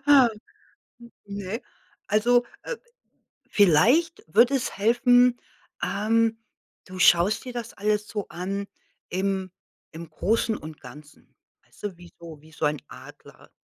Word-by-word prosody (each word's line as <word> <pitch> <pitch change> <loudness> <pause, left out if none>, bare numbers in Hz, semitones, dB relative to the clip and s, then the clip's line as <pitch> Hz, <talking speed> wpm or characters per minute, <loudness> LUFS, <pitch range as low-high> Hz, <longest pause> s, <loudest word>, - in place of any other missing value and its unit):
Ha. 275 -4 +7 1.0
N 200 0 -8
ne, 200 +4 -5 0.5
also, 240 +3 +3 0.2
äh, - - -5 0.7
vielleicht 225 - +4
würde 235 - +4
es 260 -2 -2
helfen, 245 +3 +4 0.4
ähm, 225 +2 +1 0.5
du 185 -1 -9
schaust 180 +6 +4
dir 250 - -7
das 235 -2 -6
alles 210 +1 -1
so 210 -3 -4
an 195 +3 -4 0.4
im 190 0 -2 0.4
im 165 0 -8
Großen 220 +7 0
und 155 0 -10
Ganzen, 145 +4 -15 0.3
weißt - - -23
du, 205 -4 -4
wie 175 -1 -14
so 165 -3 -11
wie 155 +1 -19
so 155 - -4
ein 150 0 0
Adler - - -14
205 Hz, 130 wpm, -25 LUFS, 175-235 Hz, 1.0 s, Ha